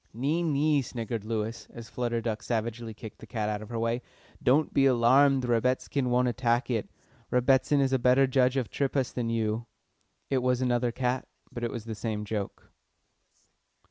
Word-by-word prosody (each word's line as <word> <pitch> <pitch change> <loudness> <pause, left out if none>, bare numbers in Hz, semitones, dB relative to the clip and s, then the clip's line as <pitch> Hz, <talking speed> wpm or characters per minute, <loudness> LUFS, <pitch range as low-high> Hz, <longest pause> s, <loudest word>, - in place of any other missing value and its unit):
"Nee, 145 +8 0
nee," 150 -2 +2
sniggered 115 -3 -4
Lewis, 110 +1 -3
as 115 -1 -9
Flutter 120 0 -2
Duck 110 -1 -3
savagely 115 0 -3
kicked 110 0 -10
the - - -12
cat 110 -2 -2
out 105 -1 -3
of 110 - -10
her 120 - -4
way. 115 +2 0 0.4
"Don't 145 +4 +3
be 135 0 +4
alarmed, 130 +2 +4
Rebbitzin 125 +2 0
won't 125 +1 +2
attack 120 0 0
it. 110 -4 -1 0.4
Rebbitzin 130 +3 +3
is 135 -1 +2
a 130 - +3
better 125 +2 +5
judge 130 0 +2
of 125 -4 -2
triphas 135 -2 -1
than 120 -2 -2
you." 115 0 -1 0.6
It 135 - +3
was 125 0 +1
another 120 -1 +1
cat, 125 +1 -1 0.2
but 120 - -6
it 120 - 0
was 115 -2 -6
the 115 - -4
same 105 -1 -3
joke. 105 -2 -5
120 Hz, 175 wpm, -28 LUFS, 115-130 Hz, 0.6 s, better